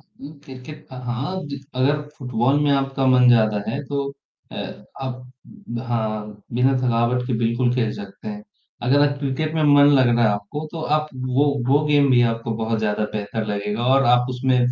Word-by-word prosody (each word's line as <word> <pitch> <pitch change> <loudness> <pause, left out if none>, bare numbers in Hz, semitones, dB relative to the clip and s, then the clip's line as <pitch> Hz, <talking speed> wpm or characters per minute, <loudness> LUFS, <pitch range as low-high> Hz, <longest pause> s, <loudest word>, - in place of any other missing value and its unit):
उम, 145 +2 -14
cricket 145 +4 -11
अ, - - -7
हाँ, 135 +10 -3
जित 140 -1 -7
अगर 140 +4 +2 0.2
फुटबॉल 125 +1 +1
में 145 -1 +2
आपका 135 -1 0
मन 125 -1 +5
ज़्यादा 110 -3 +3
है 140 - -3
तो 140 0 -2 0.5
अ, - - -8 0.5
आप 125 -1 -5 0.6
हाँ, 110 -3 -3
बिना 125 +2 +3
थकावट 125 0 +1
के 130 - -2
बिल्कुल 120 +1 +1
खेल 115 -4 0
सकते 100 +1 -9
हैं। 105 0 -7 0.4
अगर 130 +4 +3
आप 140 0 -5
क्रिकेट 145 +3 -2
में 160 - +1
मन 145 -1 +6
लग 130 - +4
रहा 120 0 +3
है - - +5
आपको 105 +10 -4
तो 165 - -5 0.2
आप 155 0 -3 0.2
वो 130 +3 +2 0.2
वो 145 +3 +3
गेम 145 -2 +3
भी 120 -1 +5
आपको 115 +1 -5
बहुत 110 0 -1
ज़्यादा 105 0 -1
बेहतर 110 +1 -3
लगेगा 105 +2 -2
और 135 0 +4
आप 125 0 +1
उसमें 130 0 +1
125 Hz, 190 wpm, -22 LUFS, 115-140 Hz, 0.6 s, मन